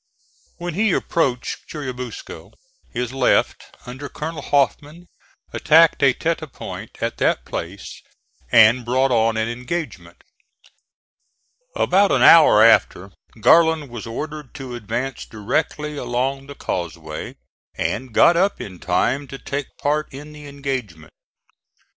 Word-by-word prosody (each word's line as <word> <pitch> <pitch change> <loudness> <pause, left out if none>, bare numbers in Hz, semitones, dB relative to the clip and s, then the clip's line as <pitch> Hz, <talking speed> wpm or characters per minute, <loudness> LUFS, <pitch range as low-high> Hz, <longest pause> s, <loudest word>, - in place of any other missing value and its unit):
When 175 -1 -5
he 205 +2 +1
approached 130 -7 -1
Churubusco 125 -5 -7 0.4
his 125 +1 -4
left, 135 - +1 0.2
under 130 +3 -8
Colonel 160 +1 -6
Hoffman, 145 +4 -1 0.5
attacked 165 +1 +4
a 140 - +6
tete 165 +6 -2
de 155 - -8
pont 135 - -9
at - - -2
that - - 0
place 90 +4 -7 0.5
and 115 +3 +6
brought 130 +3 +1
on 115 -1 +2
an 110 0 0
engagement. 125 +8 -6 1.5
About 195 +2 +3
an - - +3
hour 155 -10 +8
after, 100 -4 +3 0.3
Garland 160 +2 +4
was 120 -2 -7
ordered 150 +4 -7
to 130 -3 -7
advance 120 +3 -4
directly 150 +7 -3
along 135 +2 -2
the 140 - -10
causeway, 80 - -5 0.4
and 125 +3 -3
got 170 +9 +5
up 195 +4 +1
in 95 -3 -8
time 130 +10 0
to 135 - -8
take 140 0 -6
part 150 +1 -1
in 145 +3 -10
the 150 -1 -11
engagement. 130 - -6
135 Hz, 125 wpm, -21 LUFS, 115-150 Hz, 1.5 s, hour